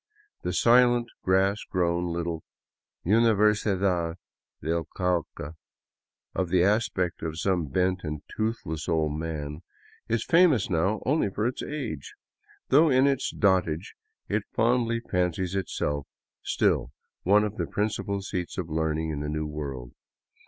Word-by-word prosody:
The - - -2
silent 120 0 +4
grass 95 +2 +2
grown 85 -1 0
little 85 -1 -3 0.6
Universidad 100 -5 +3 0.4
del 80 +2 -1
Cauca," 85 -5 -1 0.8
of 90 -2 -1
the 90 -1 +4
aspect 100 -3 +1
of 80 -1 -4
some 90 -4 +1
bent 90 +6 0
and 75 -1 -4
toothless 110 -8 -2
old 80 -3 +1
man, 75 -1 -4 0.5
is 115 -1 0
famous 165 - +4
now 95 +6 +1
only 140 -6 +2
for 105 +3 -2
its 125 +2 -1
age, 135 - -5 0.5
though 155 +4 +6
in 130 0 +4
its 140 -1 +1
dotage 95 -2 +1 0.3
it - - 0
fondly 115 0 +2
fancies 90 -2 -1
itself 75 -7 -2 0.3
still - - +1 0.3
one 105 +3 +4
of 105 +1 -3
the - - -2
principal 105 -1 -2
seats 90 -3 -4
of 90 -3 -3
learning 80 0 0
in 75 - -3
the 75 0 -3
New 75 +1 -2
World. 70 -5 -6
90 Hz, 130 wpm, -27 LUFS, 80-110 Hz, 0.8 s, though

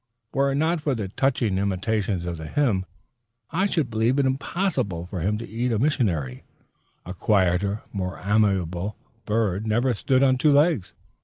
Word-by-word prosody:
Were 140 0 +2
it - - -1
not 160 +3 +1
for 145 -3 0
the 105 -5 -4
touching 120 -4 0
intimation 100 -1 -1
of 85 -1 -3
the 80 0 -7
hymn, 100 - +1 0.6
I 190 +5 +1
should 155 -10 -1
believe 115 +4 +1
it 140 - +3
impossible 130 - -1
for 90 +1 -5
him 100 +6 0
to 115 +1 -7
eat 120 +4 -2
a 115 - +1
missionary. 95 - 0 0.6
A 90 - -6
quieter, 100 +1 +1
more 95 -2 -3
amiable 100 -2 +1 0.3
bird 105 -2 0
never 120 +4 +2
stood 130 +4 +2
on 130 -1 +3
two 150 0 +4
legs. 145 - +2
110 Hz, 165 wpm, -24 LUFS, 95-135 Hz, 0.6 s, two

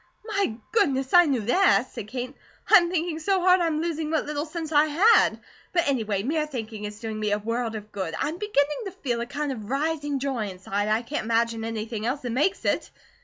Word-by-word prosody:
"My 400 - -1 0.2
goodness! 270 - +1
I 350 -2 +8
knew 265 -5 +1
that," 260 - +3
said 210 - -7
Kate. 250 +3 -5 0.4
"I - - +13
am 345 -2 +2
thinking 340 -2 -1
so 380 +4 +1
hard 365 0 +4
I'm 325 -2 0
losing 320 -2 -2
what 315 0 0
little 300 +1 -3
sense 320 0 -5
I 295 0 +5
had; 380 +10 +4 0.3
but 340 -3 +2
anyway, 220 -7 0
mere 305 +4 0
thinking 220 -6 -6
is 210 0 -7
doing 220 -2 -5
me 210 -1 0
a 205 - +2
world 230 +2 -2
of 210 0 -8
good. 190 -5 -4
I - - 0
am 335 +3 -6
beginning 300 -9 +1
to 385 - -6
feel 240 -4 0
a 235 - -4
kind 285 +2 -3
of 220 -5 -7
rising 290 +1 -1
joy 265 -5 -2
inside, 195 +2 -3
and 215 - -1
I 225 +2 0
can't 285 -1 -3
imagine 230 0 +1
anything 225 0 -3
else 270 +3 -1
that 245 - -4
makes 310 +11 0
it." - - 0
275 Hz, 225 wpm, -25 LUFS, 225-320 Hz, 0.4 s, I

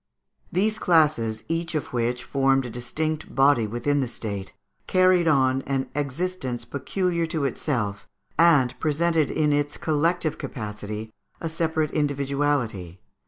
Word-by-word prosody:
_ - - -57 0.5
These 215 +4 +2
classes, 145 -10 +2
each 165 0 -2
of 150 - -3
which 120 +1 -1
formed 135 -1 +2
a 120 - -6
distinct 155 +6 -3
body 135 -5 +4
within 120 +6 0
the 130 - 0
State, 100 -5 -5 0.4
carried 185 -2 +4
on 135 -3 +3
an 135 -1 -1
existence 145 -2 -3
peculiar 170 +4 -1
to 160 -3 -1
itself, 115 -7 -2 0.3
and 145 -6 +5
presented 160 0 +1
in 150 -1 +1
its 145 0 0
collective 160 +1 0
capacity 105 -2 -6 0.3
a 165 - -3
separate 160 -2 0
individuality. 140 - -1
145 Hz, 130 wpm, -25 LUFS, 125-160 Hz, 0.5 s, and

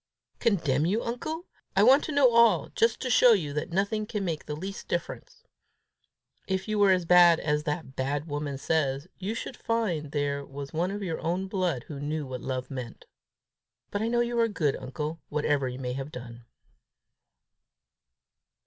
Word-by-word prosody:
"Condemn 160 - +2
you, 210 +6 0
uncle! 310 +9 -4 0.3
I 195 - +5
want 265 +6 +6
to - - -4
know 280 -4 +5
all, 230 -9 +4
just 230 0 +1
to 255 - -2
show 240 +1 +7
you 155 -9 -1
that 150 +3 -3
nothing 200 +4 0
can 210 -3 -3
make 160 -4 -3
the 150 - -3
least 195 +6 -7
difference. - - -5 1.0
If 190 +1 -2
you 215 -1 0
were 200 -1 +6
as 185 -2 +3
bad 175 -1 +7
as 150 0 0
that 150 -3 -4
bad 140 +3 -1
woman 145 -2 -3
says, 140 0 0
you 200 +4 -3
should 245 - -5
find 185 -13 -1
there 145 -1 -1
was 140 0 -8
one 170 +3 0
of 200 +1 -4
your 165 -4 -3
own 180 +4 -1
blood 180 - -1
who 145 -3 -8
knew 150 +1 -3
what 130 -1 -6
love 130 0 -4
meant. 125 -4 -7 0.9
But 205 - -2
I 220 - 0
know 240 +1 +2
you 240 0 0
are 230 - +4
good, 155 -10 0
uncle, 150 +5 -5
whatever 145 -3 0
you 125 - -6
may 125 -1 -3
have 135 +3 -5
done." 120 -2 -9
165 Hz, 180 wpm, -28 LUFS, 140-205 Hz, 1.0 s, show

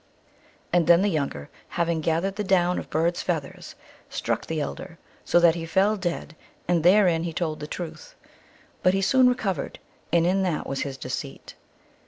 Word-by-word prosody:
And 175 -2 +3
then 170 +2 +6
the 205 - +2
younger, 140 - -2 0.2
having 170 -1 -1
gathered 170 +5 0
the 210 - -2
down 180 -2 +2
of - - -9
bird 170 +3 +1
s - - -2
feathers, 160 -6 -4 0.3
struck - - -2
the 160 -1 -2
elder, 165 +4 -5 0.3
so 175 - +3
that 170 -1 +6
he 170 -1 -5
fell 195 +6 +2
dead, 175 -4 -4 0.3
and 175 -1 +2
therein 180 -1 +4
he 170 0 -3
told 155 -2 -2
the 150 - -6
truth. 180 - -7 0.7
But 185 +1 +3
he 195 - +1
soon 255 +5 +5
re 250 - +2
covered, 195 - -3 0.3
and 170 -1 +3
in 190 +2 +2
that 180 -5 -1
was 135 - -3
his 135 -2 -4
deceit. 125 - -6
170 Hz, 185 wpm, -25 LUFS, 160-190 Hz, 0.7 s, then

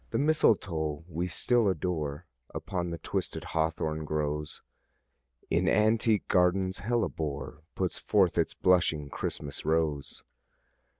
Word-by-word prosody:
The - - -1
mistletoe 85 - +2
we 85 +1 -2
still 115 +6 +2
adore 80 -4 -2 0.3
Upon 90 0 -3
the 85 - -4
twisted - - -3
hawthorn 80 -1 -1
grows: 75 0 -3 0.9
In - - +2
antique 110 0 +2
gardens 95 +1 +2
hellebore 80 -10 -2
Puts 95 -2 -2
forth 95 -5 +2
its - - 0
blushing 80 -5 +2
Christmas 70 -1 -4
rose. 80 -3 -1
85 Hz, 110 wpm, -29 LUFS, 75-95 Hz, 0.9 s, mistletoe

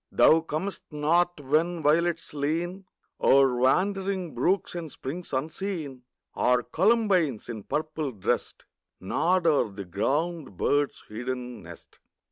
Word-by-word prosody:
Thou 160 +1 +5
comest 165 +5 -4
not 170 +3 +1
when 155 +4 0
violets 165 +3 +1
lean 170 +6 -2 0.4
O'er 135 -2 +5
wandering 185 +6 +1
brooks 175 +11 0
and 170 -4 -6
springs 165 +9 -6
unseen, 155 -1 -3 0.3
Or 125 0 +2
columbines, 185 - +2
in 110 -3 -5
purple 155 -1 -2
dressed, 105 -6 -2 0.3
Nod 175 - +1
o'er 150 -8 +3
the 100 0 -7
ground 140 - -2
bird's 145 +6 0
hidden 125 +1 -5
nest. 85 -1 -13
155 Hz, 115 wpm, -27 LUFS, 130-175 Hz, 0.4 s, Thou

